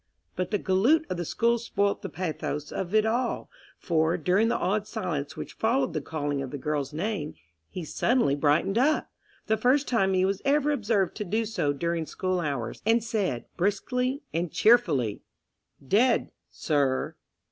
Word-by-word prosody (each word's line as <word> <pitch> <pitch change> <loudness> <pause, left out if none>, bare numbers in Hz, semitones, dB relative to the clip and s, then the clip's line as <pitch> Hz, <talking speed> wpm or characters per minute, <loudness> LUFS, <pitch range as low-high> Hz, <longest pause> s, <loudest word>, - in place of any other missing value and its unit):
But 185 -1 -2
the 210 - +1
galoot 235 - +3
of 180 - -1
the 175 - -3
school 235 +7 +1
spoilt 200 -3 0
the - - -5
pathos 155 -4 -4
of 190 +2 -3
it 215 0 +4
all, 240 +3 -1 0.3
for, 165 0 +1
during 185 +7 +2
the 235 - +1
awed 210 +2 0
silence 170 -10 -4
which - - -6
followed 230 -5 +1
the 155 - -2
calling 145 -2 -3
of 135 - -5
the 145 - -5
girl's 145 -1 -2
name, 160 -1 -3 0.3
he 180 - -6
suddenly 235 - +2
brightened 150 +9 +2
up—the 260 -5 -1
first 255 +6 +2
time 195 -6 +2
he 185 0 +3
was 195 0 -1
ever 290 +1 +2
observed 215 -8 0
to 210 - -2
do 220 +4 -1
so 180 -10 0
during 165 +2 -2
school 185 -1 -1
hours—and 150 - 0
said, 200 - -1
briskly 250 - 0
and 170 0 -1
cheerfully 160 - +3 0.7
"Dead—sir!" 155 - +1
190 Hz, 160 wpm, -27 LUFS, 155-225 Hz, 0.7 s, it